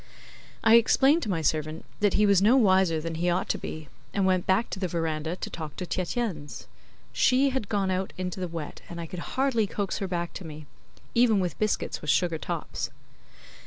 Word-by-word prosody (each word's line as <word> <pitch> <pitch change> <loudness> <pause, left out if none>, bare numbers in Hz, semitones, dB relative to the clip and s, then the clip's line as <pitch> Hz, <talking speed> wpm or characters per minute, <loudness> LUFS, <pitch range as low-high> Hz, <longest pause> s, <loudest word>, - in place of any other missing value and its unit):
I 225 +1 +8
explained 270 +7 +4
to 215 - -3
my 165 -4 -1
servant 155 +1 -1
that 205 -1 +2
he 210 - +4
was 200 -2 +4
no 225 +6 +5
wiser 190 -7 +4
than 165 +1 -4
he 170 +2 0
ought 180 +2 0
to - - 0
be, 155 -1 -7 0.3
and 200 -1 +2
went 185 -1 +1
back 190 +5 +2
to - - -4
the 190 - -1
verandah 160 -1 -2
to - - -6
talk 155 -3 -6
to 180 - -4
Tietjens. 180 - -3 0.5
She 265 +2 +3
had 255 -6 -3
gone 195 -3 0
out 185 +1 -1
into 185 0 -4
the 180 - -2
wet, 165 -3 -7
and 170 - -7
I 170 - -4
could 175 +2 -7 0.2
hardly 260 -6 +2
coax 200 0 -3
her 195 - -2
back 175 -2 -3
to - - -7
me; 155 -2 -9 0.5
even 235 -3 +4
with 180 -2 -2
biscuits 215 -1 -1
with 150 - -5
sugar 165 0 +2
tops. - - -4
185 Hz, 205 wpm, -27 LUFS, 165-210 Hz, 0.5 s, I